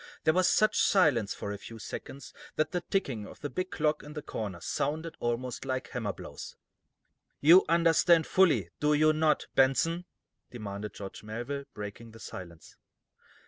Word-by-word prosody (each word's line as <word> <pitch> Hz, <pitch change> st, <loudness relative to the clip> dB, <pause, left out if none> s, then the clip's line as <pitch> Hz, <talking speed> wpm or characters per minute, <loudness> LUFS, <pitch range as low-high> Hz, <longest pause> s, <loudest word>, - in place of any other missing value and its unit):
There 160 Hz, -, +4 dB
was 185 Hz, +1 st, +3 dB
such 215 Hz, -, +3 dB
silence, 145 Hz, -, +3 dB
for 100 Hz, -, -5 dB
a 100 Hz, -, -5 dB
few 115 Hz, +2 st, -10 dB
seconds, 135 Hz, +5 st, -8 dB, 0.2 s
that 155 Hz, 0 st, 0 dB
the 180 Hz, -, -1 dB
ticking 135 Hz, -, -2 dB
of -, -, -13 dB
the 145 Hz, -, -4 dB
big 185 Hz, +7 st, -3 dB
clock 150 Hz, -3 st, 0 dB
in 150 Hz, -, -10 dB
the 150 Hz, -1 st, -6 dB
corner 100 Hz, -10 st, -5 dB
sounded 155 Hz, -, -2 dB
almost 120 Hz, +1 st, -2 dB
like 130 Hz, -1 st, -3 dB
hammer 115 Hz, -5 st, -2 dB
blows. -, -, -9 dB, 0.8 s
"You 170 Hz, +6 st, +7 dB
understand 165 Hz, 0 st, +4 dB
fully, 135 Hz, -, +3 dB
do 150 Hz, 0 st, +3 dB
you 155 Hz, +1 st, +4 dB
not, 155 Hz, -1 st, +2 dB
Benson?" 165 Hz, +6 st, +2 dB, 0.4 s
demanded 105 Hz, -3 st, -6 dB
George 100 Hz, -1 st, -8 dB
Melville, 120 Hz, +6 st, -5 dB
breaking 105 Hz, +2 st, -8 dB
the 115 Hz, -, -13 dB
silence. 85 Hz, -6 st, -10 dB
140 Hz, 160 wpm, -30 LUFS, 110-160 Hz, 0.8 s, You